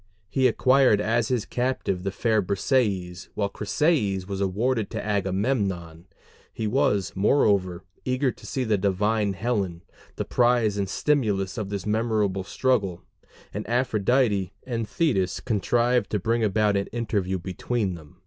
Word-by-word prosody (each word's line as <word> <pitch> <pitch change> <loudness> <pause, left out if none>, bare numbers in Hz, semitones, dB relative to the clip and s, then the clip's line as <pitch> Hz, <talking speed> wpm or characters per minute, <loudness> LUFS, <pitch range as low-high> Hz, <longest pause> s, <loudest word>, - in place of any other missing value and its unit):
He 130 -1 +3
acquired 130 -2 +4
as 115 +2 +1
his 125 -4 0
captive 125 -7 -1
the 100 - -2
fair 110 +2 +1
Briseis, 95 -4 -1
while 100 -1 0
Chryseis 100 - 0
was 100 -1 -4
awarded 110 +4 0
to - - -5
Agamemnon; 95 -4 -1 0.4
he 110 - -4
was, 100 -4 +1
moreover, 95 -5 +2 0.2
eager 130 +1 +1
to - - -13
see 130 - -2
the 110 -4 +1
divine 105 +2 +1
Helen, 95 -5 -2 0.3
the - - -3
prize 120 -4 +2
and 100 -2 -2
stimulus 105 -8 0
of 105 -4 -4
this 100 -2 -4
memorable 105 -3 0
struggle; 100 -6 0 0.5
and 105 +2 -5
Aphrodite 115 -4 +1
and 115 -4 -3
Thetis 100 - 0
contrived 120 +2 +1
to 105 - 0
bring 115 +4 0
about 105 0 +2
an 100 0 0
interview 105 -5 -2
between 95 +3 -2
them. 80 0 -12
105 Hz, 140 wpm, -25 LUFS, 95-120 Hz, 0.5 s, acquired